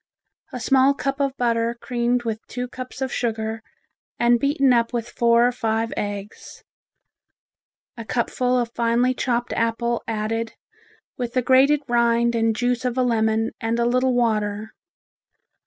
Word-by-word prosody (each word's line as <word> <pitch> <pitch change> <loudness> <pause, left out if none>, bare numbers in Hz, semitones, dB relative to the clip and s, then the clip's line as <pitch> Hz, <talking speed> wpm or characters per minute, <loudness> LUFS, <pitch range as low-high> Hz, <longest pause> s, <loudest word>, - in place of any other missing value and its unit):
A 250 - -5
small 270 +3 +3
cup 275 0 -3
of 275 -1 -1
butter 235 -1 0
creamed 240 0 -1
with 225 -2 -3
two 250 0 -4
cups 255 +1 -9
of 260 - -3
sugar 225 -1 -2 0.6
and 240 0 +3
beaten 280 -1 +3
up 235 -1 +2
with 235 -1 -2
four 235 0 +3
or - - +1
five 225 -1 -1
eggs, 205 0 -6 1.3
a 230 - -7
cupful 250 +3 0
of 240 -1 -1
finely 235 +2 +1
chopped 240 -2 -1
apple 230 +1 -1
added, 225 +1 -2 0.6
with 245 -1 -4
the 255 - +1
grated 275 +4 +4
rind 235 0 +2
and 225 -1 +1
juice 245 +1 0
of 250 0 -2
a 255 - +3
lemon 225 -2 +1
and 225 +1 -1
a 235 - +1
little 255 +1 +2
water. 215 -2 -1
235 Hz, 150 wpm, -22 LUFS, 225-250 Hz, 1.3 s, grated